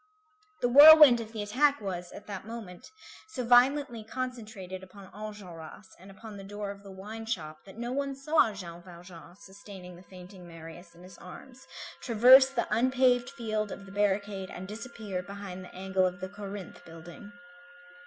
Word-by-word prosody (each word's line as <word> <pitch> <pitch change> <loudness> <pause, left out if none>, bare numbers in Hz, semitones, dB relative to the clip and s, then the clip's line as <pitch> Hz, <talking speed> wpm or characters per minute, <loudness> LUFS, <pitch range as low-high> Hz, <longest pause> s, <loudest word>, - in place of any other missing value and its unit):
The - - +2
whirlwind 290 -1 +9
of 220 -1 -9
the 215 -2 -5
attack 280 +7 +2
was, 180 -3 -6
at - - -11
that 200 0 -8
moment, 220 -6 -9 0.4
so 255 - -5
violently 245 0 +3
concentrated 215 -6 -7
upon 190 0 -14
Enjolras 190 -3 -10
and 190 +2 -15
upon 210 +1 -11
the 195 - -10
door 205 +1 -6
of 200 0 -12
the 200 - -13
wine 210 +4 -9
shop, 155 -7 -5
that 195 - -13
no 240 +1 -4
one 275 +1 -2
saw 275 -3 +2
Jean 175 -4 -9
Valjean 175 -1 -14
sustaining 190 -2 -13
the 175 - -14
fainting 180 -1 -13
Marius 165 +1 -12
in 175 - -16
his 185 -1 -14
arms, 255 +9 -13 0.3
traverse 255 +3 +7
the 270 - -2
unpaved 250 0 +2
field 215 -5 -3
of 200 - -9
the 195 - -13
barricade 200 -1 -1
and 185 +1 -8
disappear 210 -3 -6
behind 190 -1 -9
the 180 - -14
angle 190 0 0
of 180 0 -6
the 185 +1 -6
Corinthe 200 -1 -9
building. 175 +5 -12
200 Hz, 170 wpm, -29 LUFS, 185-235 Hz, 0.4 s, whirlwind